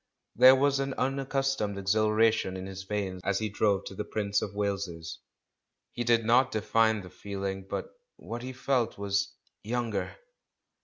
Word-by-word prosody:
There 130 +1 +9
was 140 +1 +2
an 135 -1 -2
unaccustomed 135 -5 -1
exhilaration 110 0 +2
in 95 - -6
his 95 0 -7
veins 95 -2 -3
as 100 -1 +1
he 110 +2 -1
drove 100 -1 +1
to - - -7
the - - -4
Prince 100 -2 -1
of 100 - -5
Wales's; 95 -5 -3 0.7
he 120 - -3
did 115 -1 +3
not 125 +3 +4
define 110 0 +2
the 90 - -10
feehng, 95 +1 -5
but - - -4 0.2
what 120 +1 -7
he 130 +1 -5
felt 125 -2 0
was 100 -1 -1 0.3
"younger." 115 -3 -2
105 Hz, 155 wpm, -29 LUFS, 100-120 Hz, 0.7 s, There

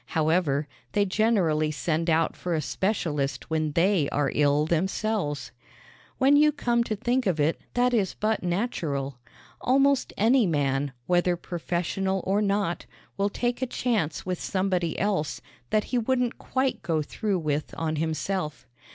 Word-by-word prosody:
However, 155 -2 +2 0.3
they 205 - +3
generally 185 -7 +2
send 160 +2 -1
out 165 0 +2
for 175 -2 -2
a - - +1
specialist 150 - -2
when 155 -2 0
they 170 -3 +3
are 145 -2 0
ill 145 0 +3
themselves. 180 -1 -1 0.7
When 275 +2 +5
you 300 +1 +6
come 240 -5 +1
to 215 - -2
think 240 +3 0
of 170 -4 +1
it 150 +3 +1
that 245 0 +3
is 205 -6 +1
but 215 +1 0
natural. 160 - -2 0.4
Almost 275 +1 +3
any 230 +1 +4
man, 140 -3 0
whether 175 0 +2
professional 180 +2 -2
or 200 +2 +2
not, 200 -4 0 0.3
will 200 +1 +1
take 240 +4 -2
a 260 - 0
chance 220 - -1
with 185 -2 -3
somebody 185 -3 0
else 190 -6 0 0.3
that 215 -1 +2
he 250 - -1
wouldn't 250 +1 0
quite 260 -5 -1
go 165 -3 0
through 205 +5 -2
with 155 -3 -2
on 160 -1 -1
himself. 160 -1 -2
180 Hz, 150 wpm, -26 LUFS, 155-220 Hz, 0.7 s, you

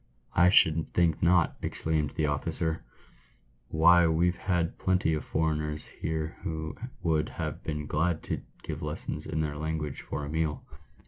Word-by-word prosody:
" - - -30
I - - +7
should 80 -3 +4
think 85 -3 +2
not!" 85 0 +4
exclaimed 80 -2 -1
the 80 - +1
officer. 80 +2 -1 0.8
""Why, 85 +2 +6
we've 85 +2 +2
had 85 -2 -1
plenty 90 -4 +2
of 75 - -1
foreigners 75 -1 -1 0.2
here 80 0 -2
who 80 -4 -4 0.3
would 80 -3 +2
have - - -4
been 75 -1 -3
glad 80 +3 0
to - - -3 0.2
give - - -5
lessons - - -4
in 80 - -1
their 75 -1 -2
language 75 -2 -3
for 75 +1 -4
a - - -6
meal." 80 -2 -1
80 Hz, 155 wpm, -29 LUFS, 75-85 Hz, 0.8 s, I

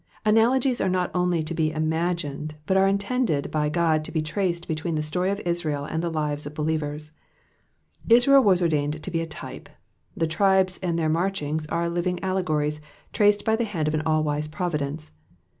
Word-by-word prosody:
'' - - -29
' - - -41
Analogies 240 +4 +3
are 190 - +1
not 180 -1 0
only 180 -2 +1
to 155 +2 -3
be 160 -1 +1
imagined, 155 -1 -2
but 190 - +1
are 190 0 +5
intended 200 - 0
by 150 -1 0
God 160 -1 +1
to - - -8
be 160 -1 -1
traced 170 +2 -2
between 160 +1 -2
the 155 - -1
story 180 +5 -1
of 200 +1 -1
Israel 160 -5 -2
and 160 +2 -2
the 170 - -1
lives 150 -2 -2
of 150 - -9
believers. 150 -1 -2 1.0
Israel 245 +4 +7
was 185 -4 +4
ordained 150 -2 0
to 185 - -5
be 165 -1 0
a 165 - -4
type; 160 - -9 0.5
the 165 - +1
tribes 190 +3 +2
and 175 -3 -1
their 160 -2 +1
marchings 155 -2 -1
are 170 +2 -1
living 175 +1 -1
allegories 155 -6 -1 0.3
traced 205 -1 +3
by 220 - +3
the 235 - 0
hand 175 -9 -2
of 155 - 0
an 155 - 0
all 155 -1 +2
wise 150 0 -1
providence. 155 -2 -3
165 Hz, 195 wpm, -25 LUFS, 155-185 Hz, 1.0 s, Israel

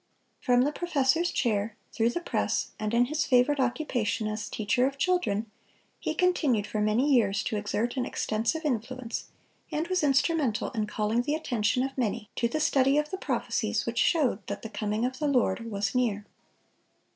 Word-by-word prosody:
From 245 0 +3
the 290 - +1
professor's 325 0 +1
chair, 215 -3 0 0.2
through 230 0 +2
the 345 - -3
press, - - -1
and 215 0 -2
in 235 +1 +4
his 305 +4 -1
favorite 255 +3 +3
occupation 245 -4 0
as 215 0 -4
teacher 245 +4 +1
of 275 0 -5
children, 230 - 0 0.5
he - - -2
continued 300 - +2
for 215 - -2
many 235 +7 +2
years 200 -5 +3
to - - -2
exert 210 +4 -1
an 255 - +1
extensive 230 +10 -1
influence, 250 -2 -3 0.5
and 315 +3 -1
was 370 -1 +1
instrumental 275 -3 +1
in 215 -4 -2
calling 215 +2 0
the 295 +4 -1
attention 250 -5 0
of 270 0 -4
many 215 -3 -2
to 235 - +2
the 310 +6 -2
study 275 -2 +3
of 300 0 0
the 380 - -3
prophecies - - -1
which - - -2
showed 270 - +2
that - - -5
the 225 - -5
coming 215 +1 -1
of 255 +1 -3
the 300 - 0
Lord 230 -4 +1
was 200 -3 -2
near. 220 -5 0
245 Hz, 180 wpm, -28 LUFS, 215-290 Hz, 0.5 s, in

